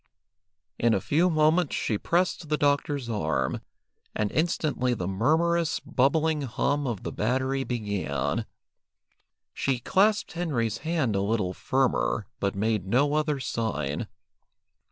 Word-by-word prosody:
In 115 -1 +3
a - - +1
few 165 - +2
moments 155 0 +2
she 105 -3 -1
pressed 175 -2 0
the 150 - +2
doctor's 145 -2 +1
arm, 80 - -1 0.5
and 105 -1 0
instantly 150 -6 0
the 90 -5 -3
murmurous, 160 - +1
bubbling 155 +4 +1
hum 140 +2 -1
of 115 -6 -3
the - - -4
battery 130 +4 0
began. 105 -6 -2 1.1
She, 135 -2 0
clasped 205 - +2
Henry's 125 -11 -1
hand 155 -9 0
a 95 - +1
little 100 -3 0
firmer, 130 -2 0
but 100 -1 -1
made 105 -1 0
no 140 +8 +2
other 150 -2 +1
sign. 75 - -2
130 Hz, 125 wpm, -27 LUFS, 110-155 Hz, 1.1 s, In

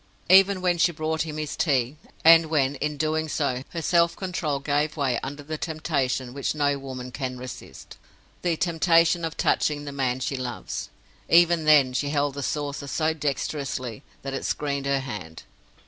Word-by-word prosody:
Even 190 0 +6
when 175 -1 +2
she 175 - +4
brought 160 0 -2
him 155 -1 -6
his 155 -1 -4
tea; 135 -4 +1 0.3
and 165 0 +8
when, 145 -4 +1
in 150 +1 -2
doing 155 +1 -1
so, 135 -4 -1
her 165 -2 -5
self 170 +1 +3
control 175 -7 -2
gave 145 +2 -1
way 130 -5 +1
under 145 +1 -6
the 155 +1 -5
temptation 140 -6 -2
which 140 +2 -2
no 145 -1 +1
woman 130 -2 -7
can 130 -1 -4
resist—the 125 - -7
temptation 170 0 +3
of 165 -1 -4
touching 145 -1 +1
the 145 - -5
man 130 -2 -1
she 130 +1 -2
loves—even 165 +6 0
then, 145 -4 +5
she 140 +3 -1
held 145 -1 0
the 140 - -5
saucer 145 0 -3
so 155 +2 0
dexterously 140 -5 -3 0.2
that 135 0 -4
it 135 - -3
screened 140 -2 -2
her 140 -1 +1
hand. 100 -12 -7
145 Hz, 165 wpm, -25 LUFS, 135-160 Hz, 0.3 s, and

